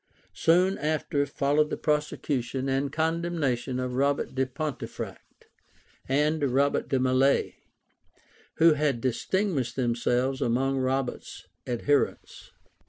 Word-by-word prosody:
Soon 180 Hz, +4 st, +3 dB
after 150 Hz, -2 st, 0 dB
followed 145 Hz, +2 st, +1 dB
the -, -, -3 dB
prosecution 135 Hz, -4 st, -1 dB
and 135 Hz, +1 st, 0 dB
condemnation 160 Hz, -6 st, -1 dB
of 125 Hz, -1 st, -3 dB
Robert 140 Hz, +2 st, 0 dB
de 130 Hz, 0 st, 0 dB
Pontefract 140 Hz, +3 st, -6 dB, 0.6 s
and 150 Hz, +3 st, +1 dB
Robert 140 Hz, +1 st, +1 dB
de 135 Hz, -, +1 dB
Mallet, 130 Hz, +2 st, +2 dB, 1.0 s
who 165 Hz, 0 st, +6 dB
had 145 Hz, -4 st, 0 dB
distinguished 130 Hz, -, -1 dB
themselves 125 Hz, +2 st, 0 dB
among 135 Hz, +2 st, +1 dB
Robert's 130 Hz, 0 st, -3 dB, 0.2 s
adherents. 135 Hz, +4 st, -1 dB
135 Hz, 100 wpm, -27 LUFS, 130-150 Hz, 1.0 s, who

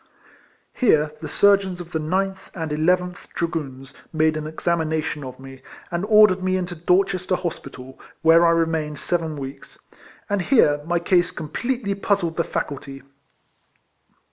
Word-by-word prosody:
Here 155 Hz, -, +3 dB
tlie 155 Hz, -, -6 dB
surgeons 195 Hz, -3 st, +3 dB
of 175 Hz, 0 st, -9 dB
the 160 Hz, -, -1 dB
9th 190 Hz, +5 st, -2 dB
and 160 Hz, -3 st, -4 dB
11th 180 Hz, +4 st, 0 dB
Dragoons 135 Hz, -6 st, -4 dB, 0.2 s
made 155 Hz, -1 st, +2 dB
an 155 Hz, 0 st, -4 dB
exam 170 Hz, +2 st, -1 dB
ination 155 Hz, -2 st, -2 dB
of 130 Hz, -1 st, -9 dB
me, 135 Hz, 0 st, -12 dB, 0.3 s
and 175 Hz, +3 st, -1 dB
ordered 210 Hz, -3 st, +5 dB
me 185 Hz, 0 st, +1 dB
into 180 Hz, -1 st, -4 dB
Dorches 185 Hz, +2 st, +1 dB
ter 185 Hz, -, +3 dB
hospital, 130 Hz, -7 st, -7 dB, 0.2 s
where 165 Hz, +1 st, +6 dB
I 170 Hz, -, +5 dB
remained 160 Hz, -3 st, 0 dB
seven 160 Hz, 0 st, -2 dB
weeks; 135 Hz, 0 st, -9 dB, 0.5 s
and 205 Hz, -2 st, 0 dB
here 150 Hz, -, +3 dB
my 175 Hz, 0 st, +1 dB
case 175 Hz, +1 st, +2 dB
completely 215 Hz, -, -3 dB
puzzled 195 Hz, -4 st, -1 dB
the 170 Hz, -, +2 dB
faculty. 135 Hz, -3 st, -5 dB
170 Hz, 145 wpm, -22 LUFS, 155-185 Hz, 0.5 s, where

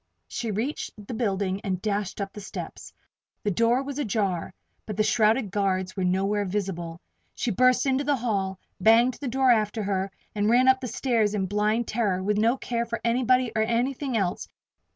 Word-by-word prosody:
She 230 Hz, -, -4 dB
reached 225 Hz, +9 st, -2 dB, 0.2 s
the 240 Hz, -, -6 dB
building 200 Hz, -4 st, -1 dB
and 190 Hz, -4 st, -2 dB
dashed 205 Hz, 0 st, -2 dB
up 200 Hz, -1 st, -4 dB
the 210 Hz, -, -8 dB
steps. 200 Hz, -, -8 dB, 0.5 s
The 205 Hz, -, +1 dB
door 230 Hz, +6 st, +2 dB
was 280 Hz, +1 st, -5 dB
ajar, 200 Hz, -, -1 dB, 0.4 s
but 210 Hz, -2 st, -5 dB
the 215 Hz, -, +3 dB
shrouded 215 Hz, 0 st, +2 dB
guards 190 Hz, -2 st, 0 dB
were 190 Hz, -, -2 dB
nowhere 195 Hz, +3 st, +1 dB
visible. 180 Hz, -4 st, -3 dB, 0.4 s
She 240 Hz, -, -1 dB
burst 255 Hz, +7 st, +3 dB
into 270 Hz, +1 st, +1 dB
the 290 Hz, 0 st, +2 dB
hall, 200 Hz, -6 st, -1 dB, 0.2 s
banged 230 Hz, +5 st, +4 dB
the 280 Hz, -, -3 dB
door 260 Hz, +1 st, +3 dB
after 215 Hz, -1 st, +1 dB
her, 195 Hz, -1 st, -1 dB, 0.2 s
and 210 Hz, 0 st, +1 dB
ran 250 Hz, +2 st, +5 dB
up 260 Hz, 0 st, +5 dB
the 255 Hz, -, -3 dB
stairs 225 Hz, -3 st, +1 dB
in 195 Hz, -2 st, 0 dB
blind 210 Hz, +4 st, 0 dB
terror, 200 Hz, -5 st, 0 dB
with 210 Hz, +1 st, +1 dB
no 230 Hz, +4 st, +3 dB
care 235 Hz, -2 st, -2 dB
for 230 Hz, 0 st, -3 dB
anybody, 250 Hz, +1 st, +2 dB
or 220 Hz, -, +2 dB
anything 245 Hz, +3 st, 0 dB
else! 185 Hz, -4 st, -1 dB
215 Hz, 185 wpm, -26 LUFS, 195-240 Hz, 0.5 s, ran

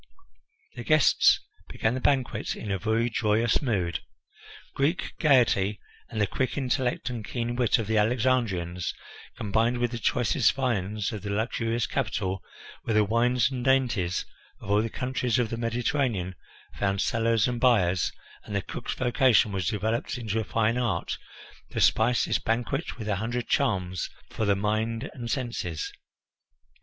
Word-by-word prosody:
The -, -, -7 dB
guests 155 Hz, -3 st, +5 dB, 0.3 s
began 110 Hz, -, 0 dB
the 130 Hz, -, -2 dB
banquet 130 Hz, -3 st, 0 dB
in 105 Hz, -, -5 dB
a 95 Hz, -, -1 dB
very 110 Hz, +5 st, +1 dB
joyous 115 Hz, 0 st, +1 dB
mood. 95 Hz, -, 0 dB, 0.7 s
Greek 150 Hz, +6 st, 0 dB
gaiety, 115 Hz, -, +3 dB, 0.3 s
and 110 Hz, -, -4 dB
the 105 Hz, -, +4 dB
quick 130 Hz, +8 st, -2 dB
intellect 130 Hz, -2 st, -1 dB
and 115 Hz, -3 st, -5 dB
keen 120 Hz, +2 st, -3 dB
wit 120 Hz, 0 st, +3 dB
of 115 Hz, -, -2 dB
the 110 Hz, +1 st, +2 dB
Alexandrians, 105 Hz, -7 st, 0 dB, 0.4 s
combined 115 Hz, +4 st, +1 dB
with 120 Hz, -1 st, 0 dB
the 120 Hz, -, -4 dB
choicest 120 Hz, +1 st, +2 dB
viands 110 Hz, -6 st, -1 dB
of 105 Hz, -, -5 dB
the 100 Hz, -, -5 dB
luxurious 115 Hz, +1 st, -1 dB
capital, 95 Hz, -3 st, -2 dB, 0.4 s
where 110 Hz, -, -1 dB
the 105 Hz, -, +5 dB
wines 120 Hz, +3 st, +2 dB
and 125 Hz, -2 st, -3 dB
dainties 120 Hz, -10 st, +1 dB, 0.3 s
of 100 Hz, -, -6 dB
all 105 Hz, +1 st, +4 dB
the 115 Hz, -, -2 dB
countries 125 Hz, -1 st, -1 dB
of 120 Hz, -3 st, 0 dB
the -, -, -1 dB
Mediterranean 115 Hz, -4 st, -1 dB, 0.5 s
found 100 Hz, -1 st, +1 dB
sellers 115 Hz, 0 st, +2 dB
and 120 Hz, -1 st, -3 dB
buyers, 95 Hz, -8 st, +3 dB, 0.3 s
and 105 Hz, -, -6 dB
the 100 Hz, -, 0 dB
cook's -, -, -5 dB
vocation 125 Hz, -3 st, +3 dB
was 95 Hz, -4 st, -2 dB
developed 110 Hz, +5 st, -1 dB
into 110 Hz, -2 st, -2 dB
a -, -, -1 dB
fine 115 Hz, +2 st, +1 dB
art, 105 Hz, -9 st, -1 dB, 0.5 s
to -, -, -4 dB
spice 120 Hz, -4 st, +3 dB
this -, -, +1 dB
banquet 120 Hz, +7 st, -2 dB
with 110 Hz, -3 st, -6 dB
a 100 Hz, -3 st, 0 dB
hundred 120 Hz, +3 st, -3 dB
charms 95 Hz, -, 0 dB, 0.2 s
for 110 Hz, -, -2 dB
the 100 Hz, -1 st, +3 dB
mind 110 Hz, +5 st, -1 dB
and 120 Hz, -4 st, -6 dB
senses. 115 Hz, -, -3 dB
115 Hz, 155 wpm, -27 LUFS, 105-125 Hz, 0.7 s, guests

